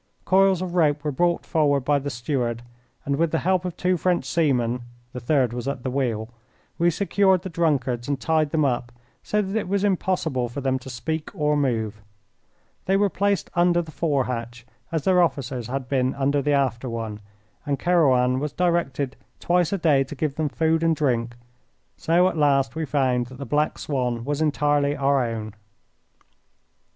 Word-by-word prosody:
Coils 190 -1 +3
of 180 -2 -5
rope 150 -4 +2
were 150 - -1
brought 175 +5 0
forward 145 -3 +2
by 145 +2 +2
the 140 +1 -4
steward, 120 -2 -2 0.4
and 140 0 0
with 165 +1 +2
the 165 - 0
help 185 -1 +2
of 175 -1 -5
two 180 0 +1
French 175 -4 0
seamen 125 -6 +1 0.3
(the 125 - -5
third 125 -1 +1
was 120 +1 -5
at 140 -3 -3
the 130 - -2
wheel) 115 -5 -1 0.5
we 170 +1 +4
secured 190 +1 +2
the 190 - -5
drunkards 135 -8 0
and 140 -2 -1
tied 155 -1 +1
them 155 0 +1
up, 125 -2 -1 0.3
so 210 0 0
that 195 +2 -4
it 220 - -1
was 200 +1 0
impossible 170 -10 0
for 120 - -6
them 130 -1 0
to 130 - -10
speak 155 +6 -4
or 150 -3 +1
move. 115 -7 -1 0.8
They 195 +1 +2
were 200 -1 +2
placed 200 0 0
under 175 0 +3
the 165 -2 -5
fore 145 -5 0
hatch, 120 -1 -5 0.3
as 160 -3 -1
their 185 -1 +4
officers 130 -7 -1
had 130 0 -4
been 130 -1 0
under 140 +1 +1
the 145 +1 +1
after 130 -3 0
one, 115 -2 -5 0.4
and 145 -2 -1
Kerouan 130 -8 +3
was 150 0 -3
directed 165 -7 0 0.2
twice 175 -1 +1
a 200 - 0
day 150 -6 +3
to 145 - -8
give 145 +1 -1
them 155 0 -1
food 160 +2 +1
and 165 -1 +2
drink. 120 -5 0 0.6
So 175 +3 +3
at 185 - -2
last 140 -3 +2
we 160 0 -2
found 130 -4 +1
that 130 0 -12
the 140 - -6
Black 150 +4 0
Swan 125 -5 -2
was 145 +2 -2
entirely 145 -1 +1
our 140 -1 +2
own. 110 -3 -4
145 Hz, 185 wpm, -24 LUFS, 125-170 Hz, 0.8 s, we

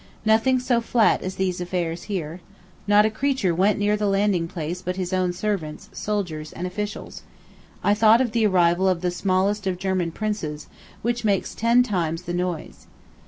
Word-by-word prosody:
Nothing 225 +4 +3
so 250 -2 +1
flat 230 -1 +3
as 185 0 -4
these 185 -2 -1
affairs 175 -1 -3
here. 175 -3 -4 0.5
Not 205 +1 +5
a 215 - +1
creature 260 -6 0
went 195 +5 +2
near 205 +1 +2
the 210 0 -1
landing 195 -3 +1
place 170 +1 -5
but 180 0 -3
his 185 0 -3
own 185 -1 +1
servants, 175 -5 -3
soldiers, 175 -8 -3
and 175 - -5
officials. 205 +3 -5 0.6
I 205 - +4
thought 220 +2 +5
of 255 -3 +1
the 225 -1 +2
arrival 180 0 +3
of 180 -2 0
the 180 -1 0
smallest 195 +2 0
of 185 -1 -1
German 185 -2 -1
princes, 165 -7 -4 0.4
which 240 +1 -1
makes 200 -3 0
ten 235 +2 +3
times 170 -6 -2
the 175 - -4
noise. 175 -2 -4
190 Hz, 175 wpm, -23 LUFS, 175-210 Hz, 0.6 s, Not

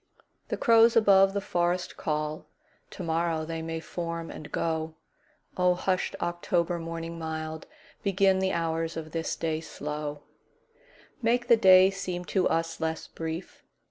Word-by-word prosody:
The - - -2
crows 230 -1 +5
above 195 -3 +6
the 200 - 0
forest 175 0 -1
call; 150 0 -3 0.4
To 185 - -8
morrow 165 -1 0
they 165 0 -4
may 165 0 -4
form 170 0 -5
and 150 - -9
go.O 165 +2 -2
hushed 185 0 -1
October 175 0 -1
morning 165 0 -5
mild, 160 0 -5 0.3
Begin 195 -1 +3
the 190 0 +1
hours 165 -1 -1
of 155 -1 -6
this 165 0 -2
day 160 -1 -2
slow, 150 -2 -5 1.0
Make 240 +1 +1
the 235 - +9
day 190 -3 +7
seem 185 -2 -4
to 190 -2 +3
us 165 0 -1
less 160 0 -2
brief. 165 +2 -6
165 Hz, 140 wpm, -28 LUFS, 160-185 Hz, 1.0 s, the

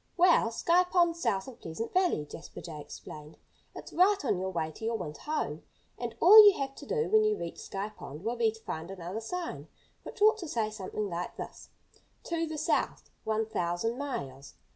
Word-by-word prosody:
"Well, 345 -9 +5
Sky 340 +10 +3
Pond's 345 -2 +2
south 205 -4 0
of 260 - -11
Pleasant 165 +8 -5
Valley," 360 - +2
Jasper 165 - -10
Jay 160 -3 -8
explained. 150 +1 -10 0.4
"It's - - -9
right 390 +3 +4
on 185 - +1
your 190 +1 -2
way 160 -3 -2
to 190 - -13
your 230 +1 0
winter 150 -6 -7
home. 305 0 -2 0.4
And - - -4
all 430 +4 +10
you 410 -2 +7
have 270 -1 -3
to - - -10
do 460 -1 0
when 435 0 +4
you 430 -1 +2
reach 170 - -6
Sky 200 +2 -4
Pond 155 -6 -10
will 230 +3 -1
be 230 -2 +3
to 225 - -14
find 160 -2 -5
another 190 +3 -5
sign, 350 +9 -5 0.3
which - - -10
ought 430 +1 +5
to 350 - -5
say 225 -6 -1
something 210 0 -4
like 175 -1 -5
this: - - -8 0.5
'To 330 -1 -2
the 315 0 -5
South, 315 +3 -1
one 220 0 0
thousand 215 +3 -2
miles.' 140 - -5
225 Hz, 200 wpm, -30 LUFS, -, 0.5 s, all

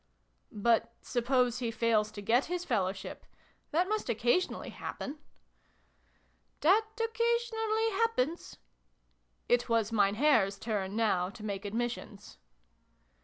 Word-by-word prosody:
" - - -44
But 230 +2 +1
suppose 250 0 +1
he 240 -2 -1
fails 225 -2 +1
to 205 -2 -7
get 240 +6 +3
his 355 +1 -3
Fellowship? 195 - -2 0.5
That 350 +4 +1
must 425 -7 -2
occasionally 240 - 0
happen." 290 +2 -6 0.7
" - - -40
That 410 +7 +4
occasionally 455 -1 0
happens." 385 - -1 0.9
It 245 0 +2
was 230 -2 +2
Mein 200 -2 +3
Herr's 220 -7 +3
turn, 200 -3 -3
now, 195 -5 +1
to 215 +1 -10
make 200 -1 -4
admissions. 225 -1 -4
235 Hz, 120 wpm, -31 LUFS, 210-355 Hz, 0.9 s, That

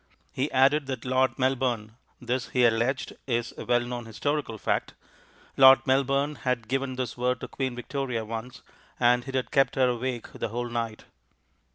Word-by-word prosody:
He 135 +3 -2
added 135 +2 +3
that 130 -3 -5
Lord 130 +1 +1
Melbourne 125 -4 0 0.3
this, 125 +1 -2
he 125 -1 +3
alleged, 120 +3 +1
is 120 -2 -1
a - - -7
well 120 0 +3
known 120 -1 -5
historical 140 +1 -2
fact - - -1 0.6
Lord 130 0 +8
Melbourne 140 +2 +1
had 120 -3 -1
given 135 0 -1
this 125 -2 -3
word 125 +1 0
to - - -5
Queen 130 -2 -3
Victoria 125 -2 -3
once, 115 +3 -7 0.4
and 125 +1 +3
it 135 - -5
had 130 - -1
kept 135 -1 +3
her 130 -1 +3
awake 125 0 -3
the - - -4
whole 120 +1 -3
night. 115 -2 -4
125 Hz, 170 wpm, -27 LUFS, 120-135 Hz, 0.6 s, Lord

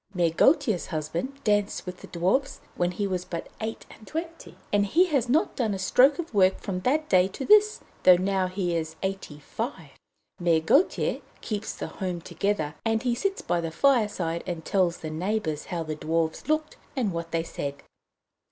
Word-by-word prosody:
Mère 170 -2 +1
Gautier's 270 - +3
husband 165 - -4
danced 205 -1 +1
with 180 0 -6
the - - -12
Dwarfs 190 +11 0 0.2
when 175 0 +1
he 190 +3 -2
was 185 -2 -2
but 170 -2 -6
eight 220 +1 -4
and 215 - -15
twenty, 330 - -6 0.2
and 205 0 +4
he 340 - +4
has 275 -8 0
not 300 +6 +2
done 220 -5 0
a - - -3
stroke 255 +9 +4
of 330 -7 -5
work 190 -2 +4
from 185 -2 -3
that 300 +10 +1
day 185 0 +4
to 230 +8 -6
this, 425 0 +5 0.2
though 180 - +8
now 190 0 +1
he 180 -2 -2
is 160 -1 -3
eighty 190 -6 -4
five. 165 - -6 0.5
Mère 165 -2 +2
Gautier 295 - +2 0.2
keeps 215 -1 -4
the - - -5
home 180 -3 -4
together, 170 -4 -2
and 225 +1 0
he 245 -2 +1
sits 390 +11 -2
by 175 0 0
the 165 - -3
fireside 205 - +1
and 170 -3 -4
tells 185 -4 +1
the 155 - -6
neighbours 165 -2 -2
how 170 -2 -3
the 155 -1 -4
Dwarfs 160 +1 -1
looked 310 0 0 0.2
and 230 -9 0
what 170 0 -4
they 165 -1 -1
said. 140 -3 -4
190 Hz, 190 wpm, -26 LUFS, 170-245 Hz, 0.5 s, though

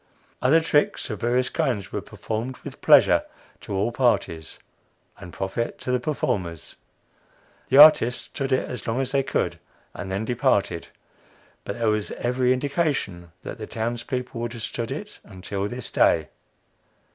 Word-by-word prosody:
"Other 155 +6 +5
tricks 145 -5 +1
of 105 - -6
various 125 +2 +1
kinds 105 -8 -1
were - - -3
performed 115 +4 -5
with - - -9
pleasure - - +6 0.4
to 100 - -6
all 100 +5 +1
parties 105 - 0 0.6
and 90 -3 -10
profit 95 +7 -3
to 125 - -4
the 125 - +2
performers. 95 - -3 0.9
The 135 - +4
artists 145 -5 +8
stood 135 0 -4
it 130 - +1
as 125 - -6
long 115 +3 0
as 135 - -1
they 140 - +3
could, 135 - -1 0.3
and 95 0 -6
then 100 +3 -2
departed. 115 -8 +1 0.8
But - - -4
there 115 -2 +1
was 105 -1 0
every 125 +1 +1
indication 130 - -1
that - - -7
the 110 - -6
towns 115 +1 -3
people 125 -2 -4
would 120 0 -3
have 115 -2 -7
stood 115 0 -3
it 205 +10 -6
until 100 0 -4
this 120 +2 -5
day." - - +3
120 Hz, 155 wpm, -24 LUFS, 100-130 Hz, 0.9 s, artists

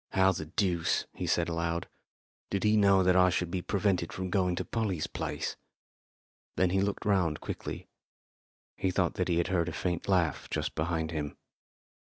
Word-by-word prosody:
"How 95 0 +5
the 80 -4 -5
deuce," 85 -1 +1
he - - -4
said 85 - +2
aloud, 85 0 -2 0.6
"did 100 - -1
he 105 0 +4
know 100 -2 +5
that 90 0 +4
I 90 0 +6
should 90 -1 -1
be 90 -1 -1
prevented 95 -3 0
from 95 -1 -4
going 90 -2 +2
to - - -3
Polly's 100 -8 -1
place?" - - -4 1.0
Then 90 -1 +2
he 95 +1 +2
looked 100 +2 -2
round 90 -7 +2
quickly. - - -6 0.9
He 95 - 0
thought 90 -1 +1
that 90 - -1
he 85 -2 +1
had 85 - +1
heard 90 -2 +1
a - - -4
faint 90 -2 -2
laugh 90 -6 +1
just - - -2
behind 80 0 -1
him. 75 -3 -4
90 Hz, 175 wpm, -30 LUFS, 85-95 Hz, 1.0 s, I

